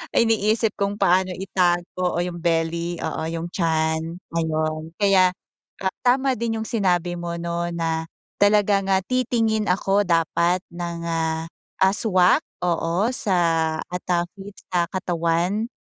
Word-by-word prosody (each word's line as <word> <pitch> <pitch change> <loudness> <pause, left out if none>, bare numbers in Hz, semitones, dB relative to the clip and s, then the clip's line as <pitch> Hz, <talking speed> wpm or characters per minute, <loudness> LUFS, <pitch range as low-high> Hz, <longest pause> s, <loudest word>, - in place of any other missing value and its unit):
iniisip 225 -1 +2
kung 200 0 0
paano 185 -1 +2
itago 180 -1 0
o 175 - +1
yung 175 -1 -5
belly 170 +1 0
oo - - -3
yung 165 +1 -4
tiyan 160 -1 0 0.2
ayun. 155 -1 -1
Kaya 195 -3 +5 0.8
tama 260 +2 +3
din 230 -1 -1
yung 220 - -4
sinabi 180 -6 +1
mo 170 0 -4
no? 170 0 -2
Na 165 -1 -2 0.3
talaga 205 0 +4
nga 195 0 +2
titingin 225 -3 +1
ako 195 +2 +2
dapat 170 +2 +2
ng 170 -1 -5
ah, 165 +3 -1
swak 185 -4 +3 0.2
oo 175 +6 +1
sa 200 -7 0 0.4
at, 180 +2 -6
ah, 175 -1 +2
fit 200 0 -11 0.2
sa 175 -1 +1
katawan. 180 +3 0
180 Hz, 130 wpm, -23 LUFS, 170-200 Hz, 0.8 s, Kaya